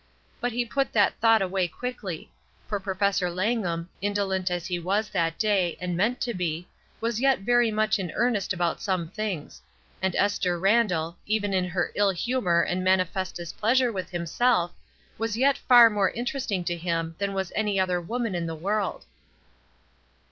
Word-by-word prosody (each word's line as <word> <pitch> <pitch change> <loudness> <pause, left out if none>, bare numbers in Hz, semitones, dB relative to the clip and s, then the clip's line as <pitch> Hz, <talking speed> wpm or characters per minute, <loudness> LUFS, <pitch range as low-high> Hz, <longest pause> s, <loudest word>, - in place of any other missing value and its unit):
But 245 - -1
he 240 +1 -1
put 275 +3 -1
that 205 -3 +3
thought 225 -2 +5
away 185 -1 0
quickly; 200 -4 -6 0.4
for 205 - -2
Professor 195 -1 0
Langham, 180 -3 -1
indolent 195 -2 0
as 175 -1 -3
he 180 -1 -2
was 200 +5 0
that 165 -1 0
day, 195 -6 +1
and 180 -1 -2
meant 220 +8 +1
to 240 - -1
be, 175 -2 -3 0.3
was 230 0 -1
yet 270 -5 +3
very 240 +2 +3
much 215 0 +1
in 180 -4 -3
earnest 235 -4 +1
about 175 -2 -1
some 185 -5 -1
things; 200 -8 -4 0.4
and 190 -1 0
Esther 190 -3 +1
Randall, 180 -4 +2
even 205 -2 0
in 185 -1 +2
her 175 0 -1
ill 205 -1 +3
humor 185 -3 +1
and 185 +1 -1
manifest 185 0 +1
displeasure 230 +8 +1
with 190 -4 -4
himself, 175 +2 +1 0.5
was 225 -1 -1
yet 275 +2 +4
far 240 -2 +8
more 205 -4 +2
interesting 240 -5 -2
to 175 0 -1
him 165 -1 -2
than 200 -1 -2
was 190 -2 -2
any 210 -2 +1
other 180 -1 +1
woman 230 +3 -2
in 170 -1 -2
the 165 - -4
world. 200 +6 -2
195 Hz, 170 wpm, -26 LUFS, 175-225 Hz, 0.5 s, far